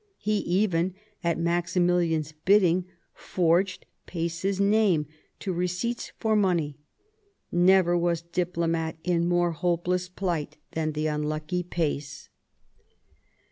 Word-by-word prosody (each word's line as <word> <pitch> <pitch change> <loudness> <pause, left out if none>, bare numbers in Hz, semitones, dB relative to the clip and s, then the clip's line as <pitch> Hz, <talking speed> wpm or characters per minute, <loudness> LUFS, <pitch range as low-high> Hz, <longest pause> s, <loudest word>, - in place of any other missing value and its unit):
He 210 +1 0
even, 185 -2 +1 0.3
at 170 -1 +1
Maximilian's 170 -2 +1
bidding, 180 +2 +3 0.3
forged 180 +2 0 0.2
Pace's 170 +3 -2
name 200 -6 +3 0.3
to 190 - -3
receipts 180 +7 -2
for 220 -1 +1
money. 170 -8 +1 0.7
Never 175 0 +4
was 170 -1 0
diplomat 170 -2 -1
in 175 -1 +1
more 175 -1 +2
hopeless 175 +2 -1
plight 170 -6 -3
than 155 -1 -2
the 155 +1 -2
unlucky 155 +3 -1
Pace. 155 -5 -3
175 Hz, 100 wpm, -27 LUFS, 165-185 Hz, 0.7 s, Never